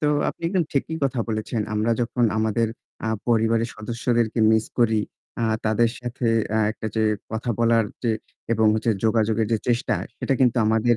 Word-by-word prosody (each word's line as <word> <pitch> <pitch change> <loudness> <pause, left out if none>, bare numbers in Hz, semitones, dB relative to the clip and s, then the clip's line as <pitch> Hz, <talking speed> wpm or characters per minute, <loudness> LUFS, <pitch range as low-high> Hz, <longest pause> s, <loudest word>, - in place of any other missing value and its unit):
তো 150 - +1 0.2
আপনি - - -7
একদম 180 -3 +1
ঠিকই 155 +3 -1
কথা 130 -3 0
বলেছেন। 110 +1 -2
আমরা 110 +2 +1
যখন 120 0 +1
আমাদের 110 +1 +1 0.4
আ - - 0 0.2
পরিবারের 115 0 +2
সদস্যদেরকে 115 +1 -1
মিস 110 0 +3
করি। 110 -2 +3 0.4
আ - - +2 0.2
তাদের 115 +1 +3
সাথে 120 0 -3 0.3
আ - - +3
একটা 110 - -6
যে 110 - +2 0.3
কথা 110 +2 -2
বলার 115 -1 +3 0.2
যে 115 - +1 0.4
এবং 110 -1 +3
হচ্ছে 110 +1 +1
যোগাযোগের 110 0 +2
যে 110 - +3
চেষ্টা 120 0 +1 0.2
সেটা 135 - 0
কিন্তু 125 -1 +4
আমাদের 110 +2 +3
115 Hz, 170 wpm, -23 LUFS, 110-120 Hz, 0.4 s, কিন্তু